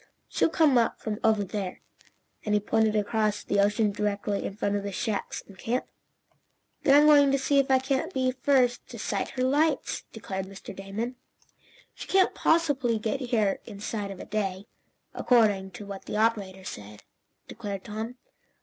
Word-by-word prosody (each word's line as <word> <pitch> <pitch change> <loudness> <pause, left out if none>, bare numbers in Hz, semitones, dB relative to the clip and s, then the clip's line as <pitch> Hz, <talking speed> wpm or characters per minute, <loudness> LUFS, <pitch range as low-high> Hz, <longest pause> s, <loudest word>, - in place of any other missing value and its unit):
"She'll - - +1
come 300 -6 +4
up 230 - 0
from 215 -1 -4
over 220 -2 +3
there," 195 -1 -4 0.6
and 210 -1 +1
he - - +4
pointed 220 +1 +1
across 210 0 0
the 200 - 0
ocean 205 +1 +3
directly 205 0 -2
in 195 - -5
front 205 -1 -1
of 205 - -1
the 200 0 -4
shacks 200 +1 -3
and 195 - -15
camp. 245 +3 -1 1.0
"Then 275 - +5
I'm 295 - +5
going 290 -2 +6
to 275 - +3
see 275 +1 +2
if 275 - +1
I 265 - +6
can't 265 +1 -1
be 260 -1 +1
the 255 - -17
first 255 -3 +2
to - - -9
sight - - -2
her 255 - +1
lights," 290 +3 +1
declared 190 -3 -5
Mr. 195 0 -10
Damon. 215 +6 -5 0.8
"She - - -9
can't 380 -1 +3
possibly 285 -8 +2
get 220 +4 -2
here 225 -6 +1
inside 205 -1 -5
of 195 -2 -8
a - - -7
day, 195 -2 -2 0.5
according 210 -6 +3
to 205 - -8
what 200 -1 -8
the - - -3
operator 205 -4 0
said," 105 - -9 0.4
declared 205 -4 -6
Tom. 220 +3 -5
215 Hz, 175 wpm, -27 LUFS, 200-255 Hz, 1.0 s, going